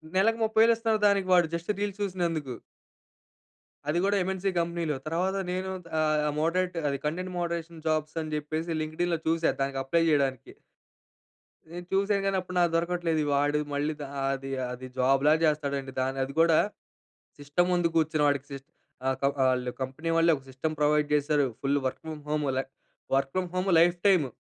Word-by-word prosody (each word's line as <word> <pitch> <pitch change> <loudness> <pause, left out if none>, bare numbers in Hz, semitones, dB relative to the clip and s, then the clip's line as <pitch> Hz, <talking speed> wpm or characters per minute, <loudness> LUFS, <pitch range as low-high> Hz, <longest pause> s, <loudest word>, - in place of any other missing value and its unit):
నెలకు 225 +4 +3
30,000 220 +1 +5
ఇస్తనారు, 225 -2 0
దానికి. 200 -2 +2
వాడు 175 -2 +5
జస్ట్ 170 +4 -2
రీల్స్ 205 -1 -3
చూసినందుకు. 170 -9 -2 1.3
అది 165 +3 +1
కూడా 200 +1 +2
ఎమ్‌ఎన్‌సి 190 +1 -1
కంపెనీలో. 170 -2 -1
తర్వాత 180 +5 0
నేను 185 +1 -2 0.3
ఆహ్, 155 -1 +2
మోడరేట్ 180 +3 0
అది 140 - -1
కంటెంట్ 180 +4 -3
మోడరేషన్ 170 -1 -4
జాబ్స్ 155 0 0
అని 155 -1 -5
చెప్పేసి 155 +2 -3
లింక్డిన్ 160 +3 -2
లో - - -4
చూసాను 165 -2 +1
దానికి 135 0 -2
అప్లై 165 +5 +1
చేయడానికి... 135 -5 0 1.2
నేను 175 +1 -7
చూసాను 200 +1 +2
గాని 195 -1 +1
అప్పుడు 180 0 -7
నాకు 175 -1 +3
దొరకట్లేదు. 170 -1 0
వాడు 145 +1 +2
మళ్ళీ 145 +2 0
ఆహ్, - - -11 0.2
అది 135 0 -5 0.2
అది 125 +1 -7
జాబు 135 +1 +3
లాగా 155 +1 +5
చేస్తాడండి 140 -3 -1
దాన్ని. 135 +1 -2
అది 135 - -9
కూడా 165 -1 +5 0.8
సిస్టమ్ 145 +5 0
ముందు 175 -1 +2
కూర్చుని. 155 -1 +2
వాడికి 145 -1 0
సీస్ 135 -1 -8 0.4
ఆహ్, 130 - +1 0.3
ఆళ్ళు 125 -1 +1
కంపెనీ 135 +6 -4
వాళ్ళే 165 0 +5
ఒక 135 - -13
సిస్టమ్ 145 +5 -3
ప్రొవైడ్ 150 0 +3
చేసారు, 145 -1 +2
ఫుల్ 140 +1 +1
వర్క్ 130 - -3
ఫ్రామ్ 155 -2 -6
హోమ్ 150 -1 0
లై 135 - 0 0.5
work 135 0 0
from 185 -1 -1
home 185 +1 0
life 175 +1 +5
time, 180 -7 +4
160 Hz, 165 wpm, -28 LUFS, 145-180 Hz, 1.3 s, 30,000